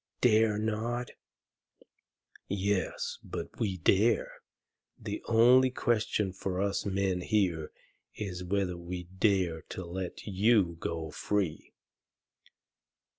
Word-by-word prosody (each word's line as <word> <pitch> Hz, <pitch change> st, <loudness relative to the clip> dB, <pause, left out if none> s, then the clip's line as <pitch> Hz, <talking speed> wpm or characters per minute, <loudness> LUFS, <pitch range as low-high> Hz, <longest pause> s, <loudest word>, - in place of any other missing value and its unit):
"Dare 110 Hz, -3 st, +4 dB
not? 110 Hz, +3 st, -2 dB, 1.4 s
YES, 100 Hz, 0 st, -1 dB
BUT -, -, -7 dB
WE 100 Hz, -5 st, 0 dB
DARE. 100 Hz, +6 st, +3 dB, 0.7 s
The 105 Hz, -1 st, -5 dB
only 125 Hz, +3 st, +6 dB
question 110 Hz, -6 st, 0 dB
for 95 Hz, -1 st, -3 dB
us 100 Hz, +1 st, 0 dB
men 95 Hz, -2 st, 0 dB
here 90 Hz, -6 st, 0 dB, 0.4 s
is 90 Hz, -4 st, -5 dB
whether 90 Hz, -1 st, -1 dB
we 90 Hz, +1 st, -6 dB
dare 95 Hz, -2 st, +1 dB
to 95 Hz, -, -6 dB
let 90 Hz, +1 st, -5 dB
you 100 Hz, -3 st, +3 dB
go 80 Hz, -2 st, -4 dB
free." 95 Hz, -5 st, -2 dB
100 Hz, 100 wpm, -30 LUFS, 90-110 Hz, 1.4 s, only